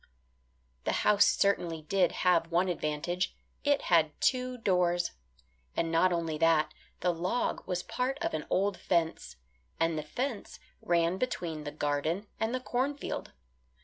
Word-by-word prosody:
The - - 0
house 205 -1 +6
certainly 175 -5 +1
did 180 +3 +2
have 170 -2 +4
one 180 +2 +2
advantage; 175 +2 -2 0.3
it 285 -1 +2
had 160 -3 +3
two 255 -1 +1
doors. 180 -5 +1 0.7
And 165 -1 0
not 175 +3 +4
only 165 -3 -1
that, 165 -1 +3 0.3
the 180 0 +2
log 180 +8 -1
was 180 -2 -1
part 260 +2 -2
of - - -2
an 155 -1 -3
old 195 0 +1
fence, 170 -3 0 0.4
and 165 -1 +1
the - - -2
fence 235 - -4 0.2
ran 170 +1 +1
between 165 -11 -3
the 145 - -4
garden 150 +6 -1
and 220 +1 0
the 255 - -1
cornfield. 265 +3 -2
175 Hz, 145 wpm, -30 LUFS, 165-205 Hz, 0.7 s, house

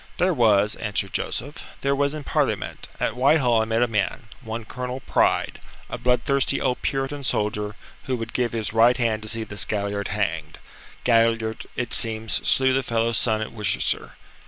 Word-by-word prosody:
"There 180 +1 +3
was," 105 -6 +4
answered 100 -3 -2
Joseph. 145 +5 -3 0.2
"There 140 0 +1
was 140 +1 +1
in 150 - -6
Parliament. - - -1
At 110 - 0
Whitehall 125 -3 +4
I - - 0
met 115 +1 +1
a - - +2
man 110 +2 -2
one 115 0 -5
Colonel 125 +2 -5
Pride - - +1 0.3
a - - -4
bloodthirsty 130 +3 +2
old 125 -2 0
Puritan 135 +1 -2
soldier, 105 -3 -1 0.3
who 130 - 0
would 115 -2 -5
give 125 -2 0
his 110 -2 -2
right 115 +2 +5
hand 115 -3 0
to 110 - -4
see 115 0 0
this 105 -2 -1
Galliard 100 -1 -2
hanged. 80 -7 -2 0.5
Galliard, 115 -1 +2
it 125 -2 -3
seems, 110 -1 -1 0.2
slew 130 0 +4
the 135 - +2
fellow's 115 -2 +1
son 110 -2 +1
at 110 - -4
Worcester. 105 -4 -1
115 Hz, 175 wpm, -24 LUFS, 110-125 Hz, 0.5 s, right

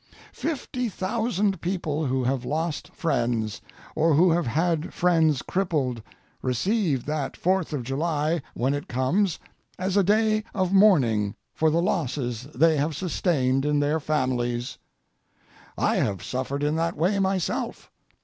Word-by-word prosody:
Fifty 255 -6 -3
thousand 205 0 -1
people 160 -5 -1
who 130 0 0
have 130 0 0
lost 160 +3 -2
friends, 115 - -1 0.3
or 160 -1 +3
who 175 +3 +5
have 170 -4 +1
had 160 +4 0
friends 160 -6 +3
crippled, 150 -11 -1 0.4
receive 150 - 0
that 150 -2 -3
Fourth 185 -2 +1
of 145 -5 -2
July, 150 +4 -1
when 130 +3 +1
it 145 0 -4
comes, 160 +9 +1 0.4
as 185 +1 -2
a 200 - +5
day 215 +2 +2
of 185 -1 0
mourning 125 - +4 0.2
for 160 - +2
the 165 +2 +1
losses 130 - -1
they 160 -1 +4
have 150 +2 0
sustained 135 -7 0
in 150 0 +1
their 145 +2 +1
families. 130 -5 -1 1.0
I - - +2
have 95 -4 -1
suffered 130 +3 -3
in 150 +1 +1
that 165 0 -1
way 185 +6 +1
myself. 190 -3 -2
155 Hz, 140 wpm, -25 LUFS, 130-185 Hz, 1.0 s, who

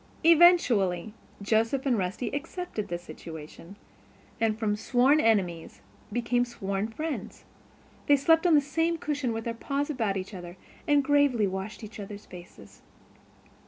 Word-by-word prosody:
Eventually 250 - +4 0.3
Joseph 225 +6 +1
and 260 -3 +2
Rusty 195 +4 -2
accepted 315 - -5
the 175 - -3
situation 165 +1 -11 0.6
and 220 -1 +1
from 215 -2 0
sworn 250 +7 +3
enemies 180 - 0 0.3
became 245 0 +1
sworn 200 -4 -3
friends. 230 -3 -6 0.6
They 290 - +6
slept 325 +5 +3
on 335 - +5
the 295 - +5
same 325 +4 0
cushion 290 -5 -2
with 225 0 -4
their 235 - -3
paws 280 +5 -2
about 220 -8 -1
each 190 +3 -6
other, 175 -1 -9 0.3
and 290 -2 +4
gravely 280 -6 +3
washed 190 +3 -5
each 215 +1 -9
other's 205 0 -8
faces. 105 - -14
225 Hz, 140 wpm, -27 LUFS, 195-285 Hz, 0.6 s, They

